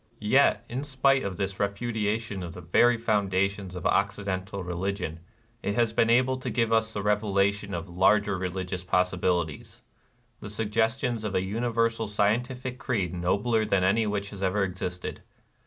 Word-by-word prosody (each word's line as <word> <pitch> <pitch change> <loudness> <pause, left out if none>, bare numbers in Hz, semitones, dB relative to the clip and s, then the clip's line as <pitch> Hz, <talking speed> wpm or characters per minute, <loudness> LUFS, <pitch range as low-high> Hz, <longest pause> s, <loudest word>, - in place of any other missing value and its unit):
Yet, 125 +6 +3
in 130 +4 -4
spite 135 -1 +2
of 95 -2 -4
this 95 -1 -3
repudiation 105 0 -1
of 85 0 -7
the 90 - -8
very 120 +8 +4
foundations 100 -3 0
of 90 0 -6
Occidental 100 -2 -1
religion, 90 -1 -3 0.4
it 100 - -2
has 115 -2 +2
been 115 0 +3
able 130 +2 +3
to 130 - -4
give 115 -2 +1
us 110 0 +2
the 105 -2 -4
revelation 100 -1 +1
of 85 +2 -5
larger 100 +3 +3
religious 90 0 -3
possibilities, 90 -3 -1 0.3
— 120 -1 -40
the 105 - -7
suggestions 110 +3 0
of 105 -2 -3
a 95 - +2
universal 115 +2 0
scientific 125 +5 -1
creed 100 -7 -1
nobler 100 +6 +1
than 95 -3 +1
any 105 +4 +3
which 100 -1 -2
has 100 -2 -8
ever 100 +1 +1
existed. 90 -1 -4
100 Hz, 155 wpm, -27 LUFS, 95-115 Hz, 0.4 s, very